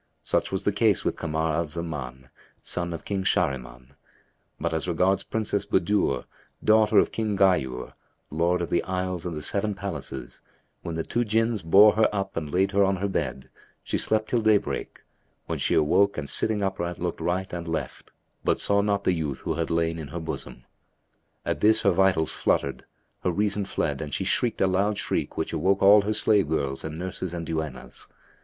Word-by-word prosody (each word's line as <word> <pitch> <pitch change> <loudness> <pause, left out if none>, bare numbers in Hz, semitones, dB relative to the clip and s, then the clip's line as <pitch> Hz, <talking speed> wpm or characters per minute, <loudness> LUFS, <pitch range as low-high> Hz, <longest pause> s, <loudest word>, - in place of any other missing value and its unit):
Such - - 0
was - - -2
the - - +2
case - - +2
with - - 0
Kamar 80 -1 -1
al 85 +1 0
Zaman, 75 -5 -6 0.3
son 85 -1 -3
of 85 - -7
King 100 -2 -2
Shahriman; 65 -5 -1 0.7
but 85 +1 -2
as 80 +2 -1
regards 90 +3 +2
Princess 105 -3 -2
Budur, 105 +4 +1 0.4
daughter 110 0 +4
of - - +4
King 110 -3 -2
Ghayur, 80 -11 +1 0.4
Lord 85 +3 +1
of - - -5
the 85 - +2
Isles 90 -2 -3
and 85 -3 -4
the 75 - -5
Seven 100 +4 -1
Palaces, 70 -10 -6 0.4
when 85 - -5
the 80 - -2
two 120 - -1
Jinns 115 -1 +1
bore 100 +6 +7
her 110 - +4
up 100 -1 -3
and 75 -3 -4
laid 95 +2 +2
her 100 0 +3
on 95 0 +2
her 95 +2 -2
bed, 65 -8 -3 0.3
she - - -1
slept 110 0 +1
till 120 - +2
daybreak, 110 -2 0 0.4
when - - -3
she - - +1
awoke 100 +7 +3
and 75 -2 -4
sitting 105 +4 +1
upright 90 -3 -2
looked 90 -1 -4
right 90 +3 -2
and 85 -1 -5
left, 80 -1 -4 0.3
but - - +1
saw 100 0 +3
not 100 -1 0
the 95 - +2
youth 75 -6 -3
who - - -2
had 85 +1 -2
lain 80 0 0
in 75 - -6
her 85 +5 -6
bosom. 80 -5 -6 0.8
At - - -1
this 110 +1 +4
her 100 - +5
vitals 90 -3 +2
fluttered, 70 -2 -1 0.4
her - - +2
reason 100 +2 0
fled - - -2
and 75 -2 -5
she - - -1
shrieked 120 -2 0
a - - +5
loud 100 +3 +1
shriek - - -2
which 80 - -2
awoke 95 +5 +1
all 100 +1 +8
her 105 +2 -1
slave 105 -4 +3
girls 70 -4 -1
and 80 0 -5
nurses 90 0 -5
and 85 -1 -4
duennas. 80 -5 -5
90 Hz, 190 wpm, -26 LUFS, 80-100 Hz, 0.8 s, all